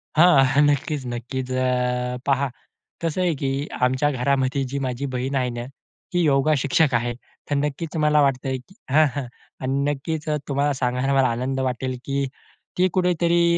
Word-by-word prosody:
हां. 155 -4 +7
हं. 135 +2 +3
नक्कीच, 145 -1 -1
नक्कीच. 125 +2 -4
अ, 125 -1 0
पहा 140 0 +2 0.5
कसं 165 +2 -1
आहे, 180 -2 +2
की 135 +1 -2 0.2
आमच्या 130 +3 +2
घरामध्ये 135 +1 +1
जी 140 +2 -3
माझी 130 +2 -3
बहीण 130 +2 -2
आहे 130 -2 +1
ना, 120 - -4 0.5
ती 175 - +2
योगा 145 0 +3
शिक्षक 140 +1 +2
आहे. 120 +1 +1 0.4
तर 145 - +1
नक्कीच 150 +3 -2
मला 150 0 +4
वाटतंय, 135 -1 +1
की 185 +10 -17 0.2
हां, 155 +3 +6
हां. 140 -2 -2 0.4
आणि 135 +1 0
नक्कीच 150 +2 -4
अ, 150 - +1
तुम्हाला 140 +1 +1
सांगायला 125 +1 0
मला 135 -1 +4
आनंद 125 +3 -2
वाटेल, 130 0 -3
की 140 0 0 0.5
ती 185 +1 +4
कुठेतरी 175 -2 +2
135 Hz, 170 wpm, -23 LUFS, 130-150 Hz, 0.5 s, हां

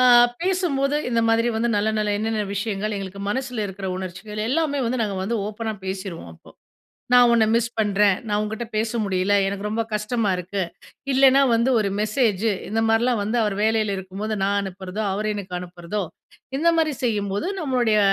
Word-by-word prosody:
அ - - +5 0.4
பேசும்போது 310 -7 +1
இந்த 230 -1 +2
மாதிரி 230 +1 +3
வந்து 235 +1 +1
நல்ல, 205 +1 +1
நல்ல 210 -1 0
என்னென்ன 220 0 -1
விஷயங்கள் 210 0 -2
எங்களுக்கு 195 0 -6
மனசுல 250 -2 -2
இருக்கிற 190 0 -6
உணர்ச்சிகள் 190 +3 -6
எல்லாமே 295 0 +1
வந்து 250 +1 -1
நாங்க 205 -3 -2
வந்து 230 +4 -1
ஓப்பனா 220 +1 -4
பேசிருவோம் 190 - -5
அப்போ. - - -18 0.6
நான் 245 -1 +7
உன்ன 225 -2 +5
மிஸ் 235 0 +2
பண்றேன் 205 -2 +3
நான் 205 0 +1
உன்கிட்ட 220 +2 -4
பேச 220 +1 0
முடியல 190 0 +1
எனக்கு 200 +1 -3
ரொம்ப 225 +2 0
கஷ்டமா 215 0 0
இருக்கு. 185 +2 -3 0.5
இல்லைனா 270 +1 +6
வந்து 235 +3 +2
ஒரு 200 - 0
மெசேஜூ. 215 -1 +1 0.2
இந்த 225 +2 0
மாரிலாம் 230 0 +2
வந்து 220 +4 0
அவர் 205 -2 0
வேலையில 220 -2 +1
இருக்கும்போது 200 +3 -4
நான் 200 +1 +1
அனுப்புறதோ, 190 +2 -5
அவர் 210 +2 -2
எனக்கு 185 -3 -5
அனுப்புறதோ 180 +3 -5 0.6
இந்த 335 +2 +3
மாதிரி 310 -3 +2
செய்யும்போது 205 - -1
நம்மளுடைய 245 -7 +2
215 Hz, 170 wpm, -23 LUFS, 200-235 Hz, 0.6 s, நான்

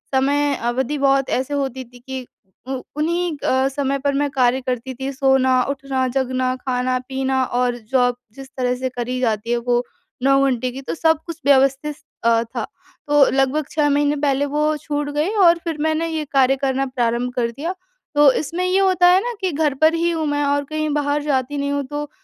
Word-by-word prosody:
समय 285 +2 +2
अवधि 250 +4 -2
बहुत 275 -1 +2
ऐसे 260 +3 -1
होती 265 -2 -2
थी 245 0 -17
कि 260 +1 -7 0.4
उ 265 -1 -3 0.2
उन्हीं 335 +1 -1
अ, 260 +1 +2
समय 275 0 -1
पर 280 +1 0
मैं 285 +1 0
कार्य 255 -1 +2
करती 255 0 -3
थी 265 +2 -4
सोना, 260 -1 +3
उठना, 270 -2 -1
जगना, 255 0 -1
खाना-पीना 260 +1 -1
और 245 0 0
जॉब 245 -2 +3 0.2
जिस 270 -1 -10
तरह 250 -1 0
से 260 +1 -3
करी 250 0 -4
जाती 230 -2 -1
है 240 - +2
वो 240 0 0 0.4
9 275 0 +4
घंटे 255 -1 0
की 265 +2 -7
तो 265 - -4
सब 320 0 +3
कुछ 335 -2 -7
व्यवस्थित 275 +2 +2 0.2
अ, 230 0 +3
था। 235 -1 -5 0.4
तो 295 -1 +5
लगभग 270 +3 +1
6 300 -1 +2
महीने 290 +1 +2
पहले 280 -1 +1
वो 300 +2 0
छूट 290 -1 -3
गई 305 +5 +1 0.2
और 340 0 +6
फिर 330 -3 -3
मैंने 315 +1 0
ये 315 -2 -3
कार्य 270 -1 +4
करना 270 0 0
प्रारंभ 245 -1 -1
कर 235 -2 -1
दिया। 310 +9 -4 0.4
तो 290 -2 +7
इसमें 335 +7 -2
ये 370 +1 +2
होता 370 -2 +4
है 360 +1 +6
ना 485 0 -3
कि 375 -1 0
घर 300 -1 +1
पर 315 +1 +5
ही 335 +1 +1
हूँ 320 -2 -1
मैं 290 0 0
और 285 0 +1
कहीं 310 +1 -2
बाहर 290 0 0
जाती 280 -1 -1
नहीं 280 0 -1
हूँ 285 0 -1
तो 295 +1 -5
275 Hz, 200 wpm, -20 LUFS, 255-295 Hz, 0.4 s, तो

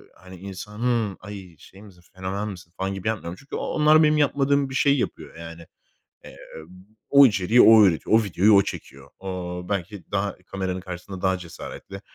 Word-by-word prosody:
hani, 95 0 -14
insanı; 105 +3 -3
"Ay, 95 -4 -10
şey 95 - -16
misin? 95 -4 -17
Fenomen 95 +3 -4
misin?" 90 -4 -11
falan 95 +1 -2
gibi 95 +1 -6
yapmıyorum. 90 -5 -5
Çünkü 140 - -9
o - - -3
onlar 155 +1 +4
benim 150 0 +3
yapmadığım 140 -1 +1
bir 135 - -7
şeyi 140 +1 +3
yapıyor - - -5
yani. 85 0 -10 0.6
Eee, - - -13 0.7
o 140 0 +8
içeriği 105 +1 +3
o 110 -2 +8
üretiyor. 90 +3 +1
O - - -1
videoyu 100 +2 +3
o 100 - +7
çekiyor. 70 -4 -9
O 90 -2 -5
belki 100 -1 -4
daha 100 -1 -2
kameranın 95 -1 -4
karşısında 90 +1 -8
daha 95 -1 +1
cesaretli, 90 +2 -10
95 Hz, 175 wpm, -23 LUFS, 90-110 Hz, 0.7 s, o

